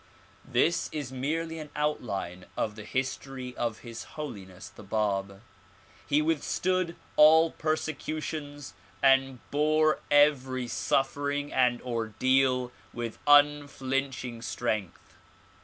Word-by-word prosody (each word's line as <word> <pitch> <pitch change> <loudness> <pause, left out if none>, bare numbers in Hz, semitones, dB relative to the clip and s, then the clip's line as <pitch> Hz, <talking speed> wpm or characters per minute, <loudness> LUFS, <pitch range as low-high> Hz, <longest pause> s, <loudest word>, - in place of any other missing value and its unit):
This 170 +1 +2
is 145 -5 -4
merely 160 +5 -2
an 150 -1 -8
outline 100 -12 -2
of 105 - -1
the 105 -1 -9
history 130 0 -4
of 115 -2 -2
His 115 -2 -8
Holiness 100 -11 -7
the - - -13
Bab. 100 -1 -2 0.6
He 150 +1 +3
withstood 170 +3 0 0.2
all 160 +2 +7
persecutions 155 -2 -4 0.3
and 135 -1 +4
bore 155 +1 +3
every 135 -4 +3
suffering 145 +3 -1
and 125 -2 +2
ordeal 125 +2 +1 0.2
with 120 -2 -5
unflinching 135 -4 +2
strength. 110 -7 -4
135 Hz, 100 wpm, -28 LUFS, 120-150 Hz, 0.6 s, all